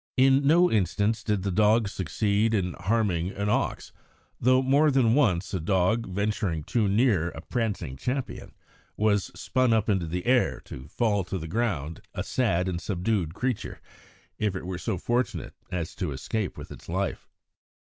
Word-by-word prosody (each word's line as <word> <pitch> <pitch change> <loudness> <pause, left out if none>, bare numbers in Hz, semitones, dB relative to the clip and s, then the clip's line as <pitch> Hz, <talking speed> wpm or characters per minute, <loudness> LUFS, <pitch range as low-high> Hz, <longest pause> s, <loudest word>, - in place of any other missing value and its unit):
In 135 +2 +4
no 175 +4 +5
instance 105 +2 +1
did 105 -4 0
the 100 - -1
dogs 105 +2 +3
succeed 105 +4 0
in 90 -3 -1
harming 95 -4 0
an 100 +1 -2
ox, - - -1 0.5
though 130 +2 +4
more 140 +4 +4
than 130 -5 +3
once 100 -11 +2
a 95 - 0
dog, 95 +6 +1
venturing 100 - -1
too 110 +5 +1
near 100 -5 +2
a 80 - -9
prancing 100 - -3
champion, 130 - -4 0.4
was 105 -2 +2
spun 130 -2 +2
up 110 -1 +1
into 95 -5 +1
the 90 +2 -4
air 125 0 +2
to 65 - -10
fall 105 +3 0
to 95 - -3
the 80 -2 -6
ground 85 -6 -2
a - - -2
sad 95 -8 0
and 90 -2 -2
subdued 95 -3 -1
creature, 125 0 -3 0.6
if 105 -3 0
it 95 - -5
were 90 -1 -4
so 110 -2 -2
fortunate 120 +7 -1 0.2
as 85 -2 -3
to 90 -6 -3
escape 95 +9 -3
with - - -9
its - - -11
life. - - -2
105 Hz, 170 wpm, -27 LUFS, 90-115 Hz, 0.6 s, no